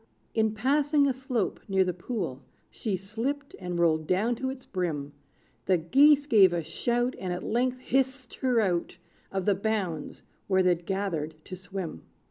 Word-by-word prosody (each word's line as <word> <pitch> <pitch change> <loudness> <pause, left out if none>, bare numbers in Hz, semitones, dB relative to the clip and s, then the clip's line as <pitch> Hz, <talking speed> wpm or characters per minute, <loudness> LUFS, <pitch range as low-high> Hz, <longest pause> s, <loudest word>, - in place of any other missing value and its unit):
In 220 -1 +1
passing 285 +5 +3
a 270 - +2
slope 250 -5 -2
near 195 -2 +3
the 180 -1 -1
pool, 175 - -4 0.3
She 210 -4 -2
slipped 230 +10 -4
and 180 -2 -4
rolled 160 -2 +2
down 210 +6 +2
to 260 +1 -2
its 260 -1 -7
brim; 155 -7 -3 0.5
The 185 - +4
geese 280 - +5
gave 200 -9 +6
a 170 -1 -1
shout, 240 +8 -1
And 185 - -3
at 180 - -3
length 250 +2 0
hissed 260 -1 0
her 250 -3 +2
out 180 -5 0 0.3
Of 190 -2 -2
the 205 - +4
bounds, 195 -6 -2 0.2
where 190 -1 +3
they'd 175 -2 +1
gathered 175 -6 -2
to 185 - -7
swim. 185 - -6
200 Hz, 165 wpm, -28 LUFS, 180-250 Hz, 0.5 s, gave